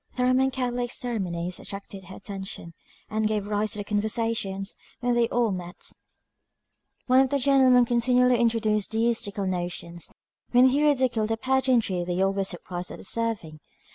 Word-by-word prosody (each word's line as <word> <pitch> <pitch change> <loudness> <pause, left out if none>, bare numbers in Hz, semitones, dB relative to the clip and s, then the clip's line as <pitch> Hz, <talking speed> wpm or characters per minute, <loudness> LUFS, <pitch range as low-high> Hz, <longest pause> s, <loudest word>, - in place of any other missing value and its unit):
The 250 - 0
Roman 255 +1 +3
Catholic 245 -2 -2
ceremonies 180 -9 -2
attracted 195 -1 -8
her 190 - -10
attention, 195 -4 -6 0.3
and 215 +1 0
gave 210 -2 -1
rise 210 0 0
to 205 - -4
conversations 210 -1 -1 0.2
when 245 -1 +1
they 235 -1 +2
all 235 -3 +1
met; 180 -1 -5 0.2
and - - -18 1.1
one 255 +1 +5
of 265 - +2
the 280 - +1
gentlemen 260 -2 +5
continually 245 +1 +3
introduced 220 -3 +1
deistical 220 -3 0
notions, 175 -2 -4 0.4
when 250 +2 +7
he 280 +3 +1
ridiculed 255 -7 +2
the 225 - 0
pageantry 250 -7 +1
they 175 +1 -2
all 195 +1 +2
were 195 0 0
surprised 180 -1 -4
at - - -8
observing. 205 -8 -2
220 Hz, 155 wpm, -26 LUFS, 195-245 Hz, 1.1 s, when